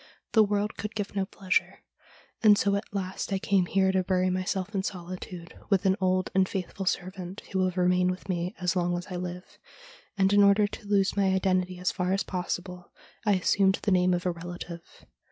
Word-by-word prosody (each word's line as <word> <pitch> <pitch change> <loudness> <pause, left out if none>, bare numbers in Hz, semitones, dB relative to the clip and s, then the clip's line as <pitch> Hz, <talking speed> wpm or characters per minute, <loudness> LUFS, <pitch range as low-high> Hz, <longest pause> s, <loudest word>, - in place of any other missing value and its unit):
The 220 - +5
world 205 0 0
could 215 +1 -5
give 205 -1 -4
no 195 -1 0
pleasure, 190 -3 -1 0.6
and 210 -2 +7
so 200 0 +2
at 200 - -4
last 190 0 -4
I 195 - +1
came 190 -1 +1
here 190 0 +2
to 190 -1 +1
bury 185 0 +1
myself 185 +2 -2
in 195 - 0
solitude, 180 -2 -7 0.2
with 195 -1 +2
an 190 0 +4
old 185 0 +1
and 190 0 +3
faithful 190 0 -4
servant, 185 0 -3
who 190 - 0
will 185 0 +3
remain 180 0 +2
with 185 +1 -5
me 175 -1 -2
as 180 0 0
long 175 -1 +1
as 175 - -6
I - - -3
live; 180 0 -7 0.6
and, 195 0 +3
in 205 - +6
order 200 +1 +5
to 205 +1 -8
lose 200 -1 +2
my 200 -1 +2
identity 185 -1 +1
as 180 +1 0
far 185 0 -1
as 195 +1 +1
possible, 180 -1 -5 0.4
I 205 - +5
assumed 190 +1 +3
the 205 - +1
name 180 -1 +4
of 175 - -4
a 180 - +2
relative.' 170 0 -9
185 Hz, 205 wpm, -28 LUFS, 180-195 Hz, 0.6 s, and